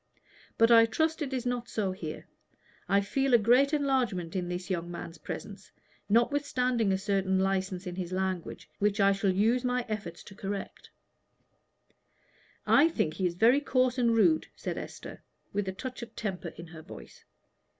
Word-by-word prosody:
But 230 Hz, +1 st, +5 dB
I 230 Hz, -1 st, +8 dB
trust 320 Hz, +7 st, 0 dB
it 280 Hz, -2 st, -2 dB
is 255 Hz, -2 st, -3 dB
not 245 Hz, -1 st, -2 dB
so 200 Hz, -4 st, -1 dB
here. 160 Hz, -4 st, -7 dB, 0.6 s
I 200 Hz, 0 st, +4 dB
feel 270 Hz, +6 st, +2 dB
a -, -, +9 dB
great 245 Hz, +6 st, +4 dB
enlargement 255 Hz, -, 0 dB
in 180 Hz, -2 st, -2 dB
this 180 Hz, 0 st, -4 dB
young 175 Hz, -1 st, -2 dB
man's 170 Hz, -1 st, -8 dB
presence, 205 Hz, -1 st, -8 dB, 0.4 s
notwithstanding 250 Hz, -2 st, +2 dB
a 190 Hz, -, +2 dB
certain 195 Hz, -1 st, 0 dB
license 190 Hz, -1 st, -1 dB
in 180 Hz, -1 st, -5 dB
his 180 Hz, -2 st, -4 dB
language, 185 Hz, -2 st, -3 dB
which 205 Hz, +1 st, +1 dB
I 200 Hz, 0 st, +5 dB
shall 195 Hz, 0 st, 0 dB
use 225 Hz, +6 st, +2 dB
my 250 Hz, -1 st, 0 dB
efforts 210 Hz, -6 st, -5 dB
to -, -, -12 dB
correct." 195 Hz, 0 st, -6 dB, 1.8 s
"I 315 Hz, +4 st, +5 dB
think 155 Hz, -, -1 dB
he 185 Hz, +2 st, 0 dB
is 170 Hz, -, -4 dB
very 235 Hz, +8 st, +5 dB
coarse 255 Hz, -2 st, +1 dB
and 235 Hz, -2 st, +3 dB
rude," 315 Hz, +8 st, +3 dB
said -, -, -4 dB
Esther, -, -, -8 dB, 0.3 s
with 200 Hz, -1 st, -1 dB
a -, -, -1 dB
touch 255 Hz, +7 st, -7 dB
of 235 Hz, -, -9 dB
temper 190 Hz, -5 st, -4 dB
in 170 Hz, -, -8 dB
her 160 Hz, -1 st, -11 dB
voice. 60 Hz, -, -12 dB
205 Hz, 170 wpm, -29 LUFS, 185-250 Hz, 1.8 s, a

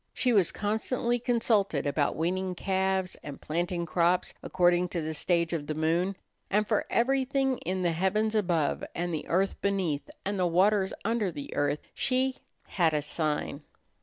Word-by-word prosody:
She 250 Hz, -2 st, +2 dB
was 195 Hz, -6 st, +4 dB
constantly 235 Hz, +3 st, -1 dB
consulted 225 Hz, -, +1 dB
about 145 Hz, +1 st, +1 dB
weaning 185 Hz, +3 st, -1 dB
calves, 190 Hz, 0 st, 0 dB
and 145 Hz, -2 st, -8 dB
planting 170 Hz, +2 st, -2 dB
crops 175 Hz, +2 st, +1 dB
according 175 Hz, 0 st, +2 dB
to 175 Hz, -, -2 dB
the 160 Hz, +1 st, -3 dB
stage 170 Hz, +2 st, 0 dB
of 150 Hz, -3 st, -3 dB
the 155 Hz, -, -2 dB
moon. 170 Hz, +5 st, +1 dB, 0.3 s
And 210 Hz, +1 st, +2 dB
for 215 Hz, -, 0 dB
everything 270 Hz, +1 st, +1 dB
in 185 Hz, 0 st, -2 dB
the 175 Hz, -, +2 dB
heavens 195 Hz, +6 st, +1 dB
above 175 Hz, -8 st, +1 dB
and 175 Hz, 0 st, -2 dB
the 155 Hz, -, -4 dB
earth 190 Hz, +3 st, 0 dB
beneath 185 Hz, -8 st, -1 dB, 0.2 s
and 200 Hz, 0 st, -1 dB
the 180 Hz, -, +3 dB
waters 190 Hz, +3 st, +3 dB
under 220 Hz, -4 st, +1 dB
the 145 Hz, -3 st, -7 dB
earth 145 Hz, +1 st, 0 dB
she 260 Hz, 0 st, 0 dB, 0.3 s
"had 165 Hz, -4 st, +1 dB
a 150 Hz, -, +1 dB
sign." 150 Hz, -1 st, -2 dB
185 Hz, 165 wpm, -29 LUFS, 165-210 Hz, 0.3 s, was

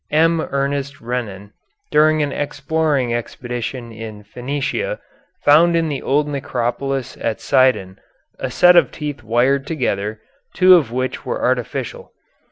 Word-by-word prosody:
M. 165 Hz, +1 st, +3 dB
Ernest 140 Hz, +1 st, -2 dB
Renan, 110 Hz, -5 st, -5 dB, 0.4 s
during 155 Hz, 0 st, +4 dB
an 145 Hz, -, -2 dB
exploring 145 Hz, -3 st, -1 dB
expedition 120 Hz, 0 st, -5 dB
in 110 Hz, -2 st, -9 dB
Phenicia, 145 Hz, -, -3 dB, 0.5 s
found 165 Hz, +4 st, +5 dB
in 165 Hz, -1 st, +1 dB
the 140 Hz, -3 st, -3 dB
old 145 Hz, +2 st, +1 dB
necropolis 135 Hz, -1 st, -2 dB
at 110 Hz, -2 st, -1 dB
Sidon 125 Hz, -8 st, +2 dB, 0.4 s
a -, -, -3 dB
set 180 Hz, 0 st, +5 dB
of 175 Hz, -, +5 dB
teeth 145 Hz, -5 st, -5 dB
wired 125 Hz, +5 st, +1 dB
together, 110 Hz, -8 st, -2 dB, 0.4 s
two 185 Hz, 0 st, +7 dB
of 155 Hz, -10 st, +4 dB
which 130 Hz, +1 st, -3 dB
were -, -, -3 dB
artificial. 125 Hz, -1 st, -2 dB
135 Hz, 130 wpm, -19 LUFS, 120-150 Hz, 0.5 s, two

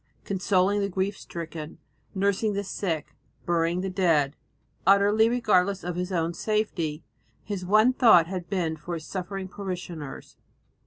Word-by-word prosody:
Consoling 195 Hz, +1 st, +2 dB
the 200 Hz, 0 st, 0 dB
grief 190 Hz, +2 st, -1 dB
stricken, 160 Hz, -4 st, -7 dB, 0.4 s
nursing 200 Hz, +2 st, +1 dB
the 200 Hz, 0 st, -2 dB
sick, 175 Hz, -5 st, -3 dB, 0.3 s
burying 170 Hz, +1 st, +1 dB
the 190 Hz, -, -2 dB
dead, 160 Hz, -7 st, +2 dB, 0.5 s
utterly 205 Hz, +3 st, +5 dB
regardless 200 Hz, -5 st, +2 dB
of 175 Hz, 0 st, -3 dB
his 180 Hz, +1 st, -3 dB
own 170 Hz, -1 st, 0 dB
safety, 170 Hz, -8 st, -1 dB, 0.4 s
his 200 Hz, -3 st, -4 dB
one 215 Hz, +7 st, +4 dB
thought 220 Hz, -10 st, +6 dB
had 180 Hz, -1 st, -6 dB
been 175 Hz, -5 st, -1 dB
for 170 Hz, +3 st, -6 dB
his 160 Hz, -2 st, -7 dB
suffering 190 Hz, 0 st, -5 dB
parishioners. 180 Hz, -7 st, -7 dB
185 Hz, 140 wpm, -26 LUFS, 170-200 Hz, 0.5 s, thought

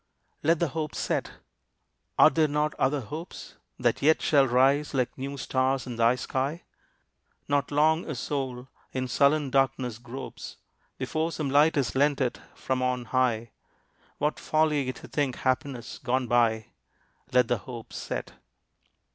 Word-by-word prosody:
Let 165 Hz, +3 st, +3 dB
the 170 Hz, -1 st, 0 dB
hope 155 Hz, +2 st, -4 dB
set. -, -, -2 dB, 0.8 s
Are 155 Hz, -, +8 dB
there 160 Hz, -1 st, +3 dB
not 150 Hz, +1 st, 0 dB
other 135 Hz, +1 st, +2 dB
hopes 155 Hz, -, -8 dB, 0.2 s
That -, -, +1 dB
yet 155 Hz, +3 st, +4 dB
shall 140 Hz, -3 st, +4 dB
rise 135 Hz, +4 st, +3 dB
like 125 Hz, -2 st, 0 dB
new 140 Hz, +1 st, -5 dB
stars 130 Hz, 0 st, 0 dB
in 120 Hz, -2 st, -6 dB
thy 115 Hz, +1 st, +4 dB
sky? 135 Hz, +6 st, -2 dB, 0.8 s
Not 140 Hz, -1 st, +1 dB
long 155 Hz, +3 st, +2 dB
a 155 Hz, -, -3 dB
soul 130 Hz, -1 st, -3 dB, 0.3 s
in 130 Hz, -1 st, -2 dB
sullen 140 Hz, +3 st, +2 dB
darkness 130 Hz, -3 st, +1 dB
gropes 125 Hz, +2 st, -8 dB, 0.4 s
Before 160 Hz, +1 st, -1 dB
some 150 Hz, -4 st, -3 dB
light 150 Hz, +3 st, +4 dB
is 135 Hz, -4 st, 0 dB
lent 145 Hz, +1 st, +2 dB
it 125 Hz, -, -1 dB, 0.2 s
from 130 Hz, -1 st, -2 dB
on 125 Hz, -1 st, 0 dB
high; 120 Hz, -3 st, +1 dB, 0.7 s
What 150 Hz, +1 st, -1 dB
folly 150 Hz, -4 st, +1 dB
to -, -, -12 dB
think 140 Hz, -4 st, -1 dB
happiness 130 Hz, -1 st, -2 dB
gone 130 Hz, +1 st, 0 dB
by! 115 Hz, -2 st, +2 dB, 0.6 s
Let 125 Hz, -2 st, +4 dB
the 120 Hz, -2 st, 0 dB
hope 115 Hz, +3 st, -9 dB
set! -, -, -5 dB
135 Hz, 145 wpm, -27 LUFS, 125-150 Hz, 0.8 s, Are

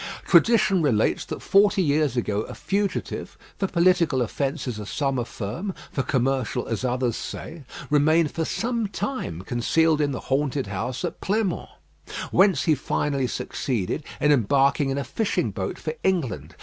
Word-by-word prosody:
Tradition 210 Hz, -5 st, +4 dB
relates 120 Hz, -8 st, +2 dB
that -, -, -6 dB
forty 200 Hz, -1 st, +4 dB
years 145 Hz, -3 st, +1 dB
ago 105 Hz, -3 st, 0 dB
a -, -, -7 dB
fugitive 200 Hz, +1 st, -2 dB, 0.2 s
for 195 Hz, -, +1 dB
political 170 Hz, -7 st, +3 dB
offences 135 Hz, -2 st, -3 dB
as 105 Hz, -, -7 dB
some 135 Hz, -3 st, 0 dB
affirm, 120 Hz, -, -4 dB, 0.2 s
for 135 Hz, -, -1 dB
commercial 130 Hz, -2 st, 0 dB
as 115 Hz, +1 st, -3 dB
others 125 Hz, -2 st, 0 dB
say 160 Hz, -4 st, -7 dB, 0.3 s
remained 155 Hz, +1 st, +4 dB
for 165 Hz, -, -2 dB
some 230 Hz, +5 st, -1 dB
time 195 Hz, -, -4 dB
concealed 155 Hz, +8 st, +2 dB
in 145 Hz, -1 st, +1 dB
the 130 Hz, -, -4 dB
haunted 140 Hz, 0 st, 0 dB
house 100 Hz, +6 st, -3 dB
at -, -, -5 dB
Pleinmont; 200 Hz, -2 st, -1 dB, 0.6 s
whence 190 Hz, 0 st, +4 dB
he 160 Hz, -, +4 dB
finally 140 Hz, -1 st, -1 dB
succeeded 125 Hz, +2 st, -2 dB, 0.2 s
in 150 Hz, -, +3 dB
embarking 140 Hz, +2 st, +3 dB
in 135 Hz, -, -1 dB
a 140 Hz, -, -1 dB
fishing 220 Hz, +7 st, -1 dB
boat -, -, -4 dB
for -, -, -4 dB
England. 170 Hz, -, -1 dB
145 Hz, 150 wpm, -24 LUFS, 125-175 Hz, 0.6 s, Tradition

